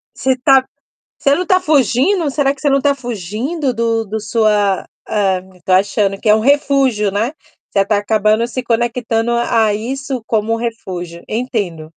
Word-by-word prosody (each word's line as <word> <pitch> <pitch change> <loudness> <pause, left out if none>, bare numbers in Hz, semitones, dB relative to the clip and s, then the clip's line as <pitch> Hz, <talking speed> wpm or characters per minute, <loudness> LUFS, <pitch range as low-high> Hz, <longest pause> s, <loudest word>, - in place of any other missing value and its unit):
Você 260 0 +1
tá 265 +1 +4 0.5
você 280 - +2
não 360 +4 0
tá 370 +1 +3
fugindo? 305 +3 +2
Será 280 0 +1
que 275 - -19
você 290 - +2
não 275 0 +2
tá 280 0 +2
fugindo 245 - -3
do 230 -1 0
do 220 +2 -4
sua 210 -2 +1 0.2
ah 195 -3 0 0.2
tô 185 - -2
achando 195 +1 +2
que 215 - -4
é 210 - +7
um 220 - +1
refúgio, 270 -5 +2
né. 220 +7 -1 0.4
Você 195 -1 +2
tá 210 +1 +1
acabando 215 +2 +1
se 250 +1 -4
conectando 235 -1 0
a 235 -1 +2
a 210 - +1
isso 260 +3 -4
como 220 0 0
refúgio. 185 -7 -6
Entendo. 215 -9 -2
230 Hz, 170 wpm, -16 LUFS, 210-265 Hz, 0.5 s, é